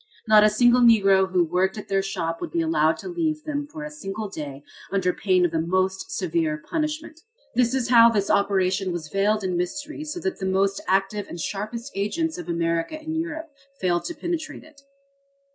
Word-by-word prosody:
Not 215 Hz, -1 st, +7 dB
a 215 Hz, -, +6 dB
single 240 Hz, +3 st, +4 dB
Negro 195 Hz, -5 st, +5 dB
who 180 Hz, -1 st, +3 dB
worked 185 Hz, +5 st, 0 dB
at 210 Hz, -, -7 dB
their 195 Hz, 0 st, +1 dB
shop 175 Hz, -4 st, -3 dB
would -, -, -4 dB
be 170 Hz, -, -1 dB
allowed 160 Hz, 0 st, +2 dB
to -, -, -8 dB
leave 320 Hz, -4 st, -2 dB
them 290 Hz, -1 st, -3 dB
for 305 Hz, 0 st, -8 dB
a 300 Hz, -, -6 dB
single 215 Hz, -8 st, -5 dB
day 145 Hz, -6 st, -7 dB, 0.3 s
under 190 Hz, -2 st, +1 dB
pain 185 Hz, -3 st, +2 dB
of 175 Hz, -, 0 dB
the 160 Hz, -1 st, 0 dB
most 185 Hz, +3 st, -1 dB
severe 160 Hz, -4 st, -1 dB
punishment. 310 Hz, -, -4 dB, 0.3 s
This 245 Hz, +1 st, +2 dB
is 250 Hz, -3 st, -1 dB
how 235 Hz, -1 st, +8 dB
this 205 Hz, -3 st, 0 dB
operation 190 Hz, -1 st, +1 dB
was 165 Hz, -3 st, -5 dB
veiled 205 Hz, +3 st, +1 dB
in 185 Hz, -1 st, -1 dB
mystery 295 Hz, -, -3 dB
so 310 Hz, +3 st, -5 dB
that 375 Hz, +2 st, -3 dB
the 190 Hz, -, -2 dB
most 195 Hz, +1 st, +1 dB
active 195 Hz, +2 st, 0 dB
and 170 Hz, -, -8 dB
sharpest 215 Hz, +8 st, -4 dB
agents 310 Hz, -, -2 dB
of 175 Hz, 0 st, -8 dB
America 170 Hz, -, -1 dB
and 315 Hz, +1 st, -5 dB
Europe 320 Hz, -1 st, -4 dB, 0.3 s
failed 175 Hz, -2 st, 0 dB
to 340 Hz, -, -4 dB
penetrate 340 Hz, -2 st, -4 dB
it. 305 Hz, -3 st, -18 dB
200 Hz, 195 wpm, -24 LUFS, 180-290 Hz, 0.3 s, how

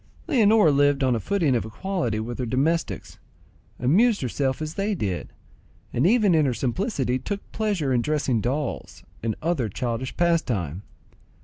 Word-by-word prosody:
Leonora 220 Hz, -, +4 dB
lived 145 Hz, 0 st, +3 dB
on 130 Hz, -2 st, +3 dB
a -, -, -1 dB
footing 165 Hz, -, +1 dB
of 115 Hz, -, 0 dB
equality 120 Hz, -, -2 dB
with 120 Hz, +3 st, -5 dB
her 125 Hz, -, -1 dB
domestics, 155 Hz, +8 st, -1 dB, 0.6 s
amused 200 Hz, -, +3 dB
herself 130 Hz, +1 st, -1 dB
as 155 Hz, 0 st, -4 dB
they 200 Hz, +2 st, -1 dB
did, 95 Hz, -, -3 dB, 0.6 s
and 130 Hz, +8 st, +3 dB
even 215 Hz, -3 st, +4 dB
in 155 Hz, -3 st, +3 dB
her 125 Hz, -, 0 dB
simplicity 130 Hz, -, -1 dB
took 205 Hz, +6 st, -4 dB
pleasure 200 Hz, -11 st, 0 dB
in 120 Hz, -, +2 dB
dressing 140 Hz, -4 st, 0 dB
dolls 135 Hz, +5 st, -3 dB, 0.2 s
and 110 Hz, -1 st, -1 dB
other 155 Hz, -9 st, 0 dB
childish 120 Hz, +4 st, -3 dB
pastime. 120 Hz, -, 0 dB
140 Hz, 150 wpm, -24 LUFS, 120-185 Hz, 0.6 s, Leonora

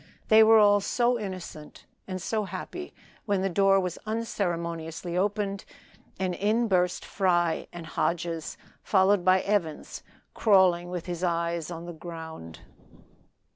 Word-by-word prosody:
They 220 Hz, 0 st, +8 dB
were 220 Hz, 0 st, +7 dB
all 205 Hz, -1 st, +6 dB
so 240 Hz, +4 st, +1 dB
innocent 185 Hz, -7 st, -8 dB, 0.2 s
and 185 Hz, -1 st, -4 dB
so 215 Hz, +3 st, -2 dB
happy, 275 Hz, -, -7 dB, 0.4 s
when 200 Hz, -2 st, +1 dB
the 195 Hz, -, 0 dB
door 195 Hz, +2 st, +4 dB
was 180 Hz, -2 st, -3 dB
unceremoniously 170 Hz, -6 st, -3 dB
opened, 200 Hz, +1 st, -1 dB, 0.6 s
and 185 Hz, -1 st, -1 dB
in 215 Hz, +5 st, +1 dB
burst 180 Hz, -3 st, +1 dB
Fry 175 Hz, -4 st, 0 dB
and 175 Hz, -1 st, -8 dB
Hodges, 165 Hz, 0 st, -2 dB, 0.2 s
followed 190 Hz, -1 st, +3 dB
by 185 Hz, +1 st, +4 dB
Evans 190 Hz, -7 st, -2 dB, 0.3 s
crawling 185 Hz, -5 st, +3 dB
with 180 Hz, -2 st, -5 dB
his 175 Hz, -1 st, -5 dB
eyes 170 Hz, -2 st, -1 dB
on 170 Hz, -1 st, -7 dB
the 175 Hz, -, -7 dB
ground. 160 Hz, -, -9 dB
185 Hz, 135 wpm, -27 LUFS, 170-205 Hz, 0.6 s, They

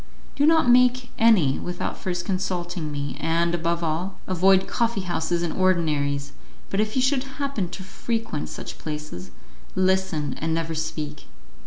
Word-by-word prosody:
"Do 290 Hz, -, +3 dB
not 320 Hz, -4 st, +5 dB
make 250 Hz, 0 st, +4 dB
any 195 Hz, -13 st, +5 dB
without 175 Hz, 0 st, -3 dB
first 175 Hz, -2 st, -3 dB
consulting 180 Hz, -4 st, -2 dB
me, 140 Hz, -2 st, -4 dB
and, 170 Hz, +1 st, +1 dB
above 170 Hz, 0 st, 0 dB
all, 170 Hz, +4 st, -2 dB
avoid 190 Hz, +1 st, +4 dB
coffee 235 Hz, -3 st, 0 dB
houses 175 Hz, -1 st, -1 dB
and 170 Hz, -, -1 dB
ordinaries, 150 Hz, -6 st, +1 dB, 0.4 s
but 195 Hz, -, 0 dB
if 215 Hz, 0 st, 0 dB
you 260 Hz, -, +3 dB
should 265 Hz, 0 st, +2 dB
happen 275 Hz, -11 st, -2 dB
to 190 Hz, -, -7 dB
frequent 225 Hz, -3 st, -3 dB
such -, -, -7 dB
places, 150 Hz, -, -6 dB, 0.5 s
listen 185 Hz, -5 st, +1 dB
and 160 Hz, +1 st, 0 dB
never 165 Hz, 0 st, -2 dB
speak. 155 Hz, -2 st, -4 dB
175 Hz, 150 wpm, -24 LUFS, 160-200 Hz, 0.5 s, not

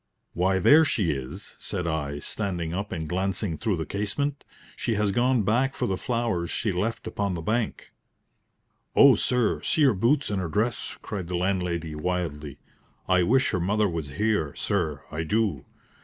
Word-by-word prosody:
"Why, 95 Hz, +2 st, +2 dB
there 150 Hz, -, +7 dB
she 105 Hz, -, +1 dB
is," 65 Hz, -3 st, -6 dB
said 90 Hz, -, -4 dB
I, 75 Hz, -3 st, -2 dB
standing 85 Hz, 0 st, -3 dB
up 100 Hz, +3 st, -3 dB
and 80 Hz, -4 st, -3 dB
glancing 95 Hz, +1 st, -1 dB
through 105 Hz, 0 st, -1 dB
the 80 Hz, -, -3 dB
casement. 140 Hz, +8 st, -2 dB, 0.3 s
"She 115 Hz, -, -1 dB
has 105 Hz, -1 st, +1 dB
gone 120 Hz, +1 st, +2 dB
back 125 Hz, +7 st, +1 dB
for -, -, -1 dB
the 95 Hz, -, 0 dB
flowers 115 Hz, -6 st, -1 dB
she 110 Hz, -, -1 dB
left 110 Hz, +5 st, -2 dB
upon 100 Hz, -4 st, -2 dB
the 85 Hz, -, -4 dB
bank." 110 Hz, +5 st, -2 dB, 1.0 s
"Oh, -, -, +8 dB
sir, 125 Hz, -3 st, +1 dB
see 155 Hz, -, +2 dB
her 135 Hz, -4 st, +5 dB
boots 120 Hz, +7 st, +1 dB
and 100 Hz, -2 st, 0 dB
her 85 Hz, -, -3 dB
dress!" 105 Hz, +7 st, -1 dB
cried 95 Hz, -4 st, -5 dB
the 90 Hz, 0 st, -2 dB
landlady, 90 Hz, -3 st, -1 dB
wildly. 75 Hz, -3 st, -3 dB, 0.5 s
"I 90 Hz, -1 st, +4 dB
wish 130 Hz, +8 st, +3 dB
her 90 Hz, -, 0 dB
mother 105 Hz, +4 st, +2 dB
was 80 Hz, -6 st, -4 dB
here, 105 Hz, -5 st, 0 dB
sir 80 Hz, -8 st, -1 dB
I 80 Hz, +1 st, -3 dB
do. 100 Hz, -, 0 dB
95 Hz, 170 wpm, -26 LUFS, 85-110 Hz, 1.0 s, Oh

